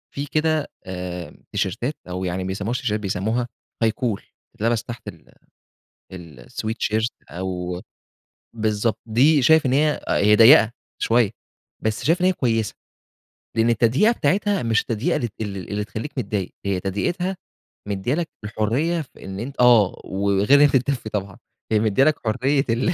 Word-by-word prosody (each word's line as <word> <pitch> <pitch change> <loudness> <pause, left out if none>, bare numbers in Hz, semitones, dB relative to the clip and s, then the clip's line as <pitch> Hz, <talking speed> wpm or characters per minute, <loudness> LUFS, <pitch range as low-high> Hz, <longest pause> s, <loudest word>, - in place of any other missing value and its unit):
فيه 140 +1 -3
كده 155 -1 +1 0.2
آآ 90 -1 -6
تيشيرتات 115 - -1 0.2
أو 90 +1 -4
يعني 90 +1 -2
ما - - -4
بيسمّوهاش 105 +7 -2
تيشيرتات 110 -5 -1
بيسمّوها 110 +5 -1 0.4
high 110 - +3
collar 115 -5 0 0.4
تتلبس 115 +1 0
تحت 120 -1 -9
ال - - -11 0.8
ال 80 -9 -11
sweatshirt 110 0 -1 0.2
أو 90 0 -4 0.7
بالضبط. 110 -1 0
دي 135 +7 +4
شايف 160 +4 +5
إن 130 - +2
هي 150 +2 +2
هي 105 +1 +4
ضيَّقة 115 0 +7 0.3
شوية، 115 -3 +3 0.5
بس 110 -1 -1
شايف 170 +4 +3
إن - - +3
هي 185 - +4
كويسة، 115 - 0 0.8
لإن 115 +1 +3
التضييقة 120 - +3
بتاعتها 205 -1 +1
مش 115 -1 +2
التضييقة 120 +10 -1
ال 120 - -2
ال 100 -3 -5
اللي 105 0 -2
تخلّيك 110 +7 -6
متضايق، 100 -6 -2
هي 100 -2 0
تضييقتها 175 - -2 0.5
مديِّة 100 +5 -1
لك 165 -1 -2 0.2
الحرية 125 +11 0
في 145 - -13
إن 95 0 -6
أنت 130 +5 -6
آه. 115 -6 +5
وغير 100 +7 +3
إنّها 145 - +8
تتدفّي 130 -4 0
طبعًا، 100 -2 -4 0.3
هي 110 - +4
مديِّة 110 +4 +3
لك 155 +1 +4
حرية 135 +5 +1
ال 120 +10 +1
115 Hz, 155 wpm, -22 LUFS, 100-135 Hz, 0.8 s, إنّها